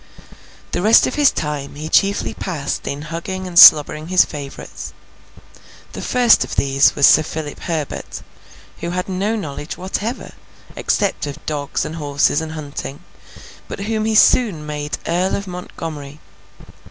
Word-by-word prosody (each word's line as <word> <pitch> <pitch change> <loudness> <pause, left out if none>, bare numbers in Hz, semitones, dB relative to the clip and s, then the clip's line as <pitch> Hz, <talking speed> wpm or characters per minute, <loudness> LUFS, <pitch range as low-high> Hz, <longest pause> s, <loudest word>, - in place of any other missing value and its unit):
The 175 - -2
rest 215 +4 +6
of - - -3
his 290 -3 +4
time 145 -2 -4
he 155 +2 -6
chiefly 195 - +1
passed 145 - -4
in 140 +1 -4
hugging 170 +4 -5
and 180 -1 +2
slobbering 155 +1 +7
his 185 +1 +4
favourites. 145 -3 -8 1.0
The - - -6
first 245 -2 +4
of - - -7
these 135 0 +3
was 140 - +4
Sir 155 - +6
Philip 155 -1 -6
Herbert, 160 -4 -5 0.6
who 170 - -4
had 180 +1 -3
no 195 +4 -1
knowledge 150 -6 -6
whatever, 205 +6 -4 0.4
except 200 -7 -1
of 145 +2 -9
dogs, 145 -2 -3
and 160 - -6
horses, 145 0 +1
and 160 0 -6
hunting, 145 -1 -7 0.7
but - - -7
whom 215 +1 -2
he 220 0 0
soon 210 -9 +3
made 150 -1 -4
Earl 180 +3 0
of 200 - -5
Montgomery. 160 -5 -8
160 Hz, 150 wpm, -19 LUFS, 145-190 Hz, 1.0 s, slobbering